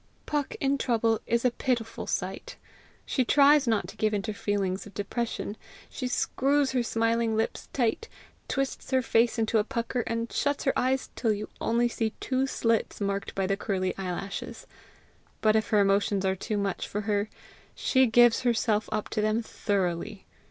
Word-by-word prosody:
Puck 290 Hz, -2 st, -2 dB
in 275 Hz, 0 st, +1 dB
trouble 230 Hz, -3 st, +1 dB
is 235 Hz, +1 st, +1 dB
a 250 Hz, -, +4 dB
pitiful 235 Hz, -3 st, -2 dB
sight. -, -, -3 dB, 0.5 s
She 260 Hz, -, +1 dB
tries 285 Hz, +2 st, +5 dB
not 220 Hz, -2 st, +1 dB
to -, -, -10 dB
give 215 Hz, -1 st, +1 dB
in 200 Hz, -, -1 dB
to 215 Hz, -, -3 dB
feelings 200 Hz, -2 st, -2 dB
of 205 Hz, -, -15 dB
depression. 220 Hz, 0 st, -3 dB, 0.4 s
She 255 Hz, -, -3 dB
screws 275 Hz, +2 st, +1 dB
her 255 Hz, -2 st, +1 dB
smiling 230 Hz, -1 st, +1 dB
lips 225 Hz, -, -2 dB
tight, 255 Hz, -, 0 dB, 0.4 s
twists 275 Hz, -1 st, -2 dB
her 260 Hz, -1 st, +2 dB
face 230 Hz, +1 st, +2 dB
into 225 Hz, 0 st, +2 dB
a -, -, +2 dB
pucker, 235 Hz, +3 st, -2 dB
and 230 Hz, 0 st, -2 dB
shuts 285 Hz, 0 st, 0 dB
her 270 Hz, -, +2 dB
eyes 260 Hz, +1 st, 0 dB
till 225 Hz, -3 st, +1 dB
you 210 Hz, +1 st, -5 dB
only 235 Hz, +1 st, +2 dB
see 225 Hz, -2 st, -2 dB
two 265 Hz, 0 st, 0 dB
slits 230 Hz, -4 st, 0 dB
marked 200 Hz, -1 st, -2 dB
by 195 Hz, -, 0 dB
the 195 Hz, +1 st, +1 dB
curly 190 Hz, -2 st, -2 dB
eyelashes. 195 Hz, +1 st, -5 dB, 0.7 s
But 215 Hz, 0 st, +3 dB
if 220 Hz, -1 st, +1 dB
her 210 Hz, -, +4 dB
emotions 195 Hz, 0 st, +2 dB
are 190 Hz, 0 st, +2 dB
too 210 Hz, +3 st, -3 dB
much 200 Hz, -2 st, -2 dB
for 210 Hz, -, -3 dB
her 205 Hz, 0 st, 0 dB, 0.5 s
she 260 Hz, -1 st, +3 dB
gives 240 Hz, 0 st, +5 dB
herself 225 Hz, -3 st, +1 dB
up 215 Hz, -1 st, -1 dB
to 215 Hz, -, -1 dB
them 215 Hz, +2 st, +1 dB
thoroughly. 195 Hz, -1 st, -2 dB
225 Hz, 175 wpm, -28 LUFS, 205-250 Hz, 0.7 s, tries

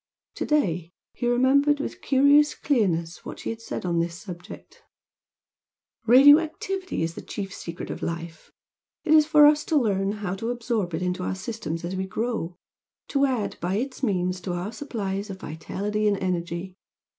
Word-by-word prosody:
To -, -, -4 dB
day 180 Hz, -, +1 dB, 0.2 s
he 240 Hz, -, -2 dB
remembered 275 Hz, +4 st, +3 dB
with 285 Hz, -, -5 dB
curious 285 Hz, +2 st, +4 dB
clearness 175 Hz, -, 0 dB
what -, -, -7 dB
she -, -, -4 dB
had 225 Hz, 0 st, -7 dB
said 225 Hz, -, -5 dB
on 170 Hz, -1 st, +1 dB
this 170 Hz, 0 st, -2 dB
subject 175 Hz, -2 st, -10 dB, 1.3 s
"Radio 280 Hz, +6 st, +9 dB
activity 375 Hz, -, -3 dB
is 165 Hz, 0 st, -2 dB
the -, -, -8 dB
chief 195 Hz, -2 st, -6 dB
secret 170 Hz, 0 st, -6 dB
of -, -, -6 dB
life. 165 Hz, -1 st, -5 dB, 0.5 s
It 315 Hz, -, +3 dB
is 305 Hz, -1 st, +6 dB
for 300 Hz, -2 st, +7 dB
us 300 Hz, +1 st, +5 dB
to 320 Hz, -, 0 dB
learn 200 Hz, -5 st, +1 dB
how 205 Hz, -4 st, -4 dB
to 225 Hz, +4 st, -3 dB
absorb 230 Hz, -7 st, -2 dB
it 180 Hz, -, -3 dB
into 180 Hz, 0 st, -1 dB
our 180 Hz, -, -2 dB
systems 185 Hz, -5 st, -5 dB
as 180 Hz, +2 st, -4 dB
we 190 Hz, 0 st, -2 dB
grow, 190 Hz, -4 st, -3 dB, 0.5 s
to 280 Hz, -1 st, +3 dB
add 245 Hz, -6 st, -2 dB
by 180 Hz, +3 st, -1 dB
its 260 Hz, +5 st, -3 dB
means 185 Hz, -6 st, 0 dB
to 180 Hz, +1 st, -3 dB
our 175 Hz, +4 st, -3 dB
supplies 205 Hz, -8 st, -4 dB
of 190 Hz, -1 st, -7 dB
vitality 205 Hz, +7 st, -2 dB
and 205 Hz, -1 st, +2 dB
energy. 180 Hz, 0 st, -3 dB
205 Hz, 175 wpm, -25 LUFS, 180-265 Hz, 1.3 s, Radio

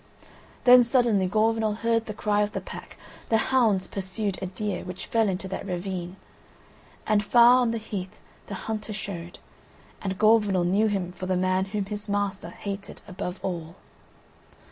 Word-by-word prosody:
Then 250 Hz, 0 st, +8 dB
suddenly 235 Hz, -6 st, +2 dB
Gorvenal 220 Hz, +1 st, +1 dB
heard 230 Hz, 0 st, 0 dB
the 215 Hz, -, -5 dB
cry 210 Hz, -1 st, +1 dB
of 210 Hz, 0 st, -1 dB
the -, -, -2 dB
pack; -, -, -10 dB, 0.3 s
the 225 Hz, -, +4 dB
hounds 220 Hz, -6 st, +2 dB
pursued 195 Hz, +1 st, -3 dB
a 190 Hz, -, -2 dB
deer, 190 Hz, 0 st, -3 dB
which 185 Hz, 0 st, -7 dB
fell 225 Hz, -2 st, +2 dB
into 190 Hz, 0 st, -3 dB
that 190 Hz, -, -4 dB
ravine. 180 Hz, -1 st, -4 dB, 0.9 s
And 210 Hz, -1 st, +2 dB
far 240 Hz, +3 st, +6 dB
on 245 Hz, -, +2 dB
the 230 Hz, -, -1 dB
heath 205 Hz, -3 st, -6 dB, 0.3 s
the 200 Hz, -, -5 dB
hunter 215 Hz, -1 st, -4 dB
showed 175 Hz, -4 st, -6 dB, 0.3 s
— -, -, -27 dB
and 190 Hz, -1 st, -3 dB
Gorvenal 210 Hz, -4 st, +4 dB
knew 200 Hz, +5 st, +3 dB
him 195 Hz, -4 st, -1 dB
for 185 Hz, +1 st, -7 dB
the 185 Hz, -1 st, +1 dB
man 185 Hz, +1 st, +1 dB
whom 200 Hz, 0 st, -3 dB
his 205 Hz, +1 st, -6 dB
master 200 Hz, -3 st, -1 dB
hated 195 Hz, +2 st, -7 dB
above 180 Hz, -1 st, -5 dB
all. 170 Hz, -3 st, -4 dB
200 Hz, 165 wpm, -26 LUFS, 185-220 Hz, 0.9 s, Then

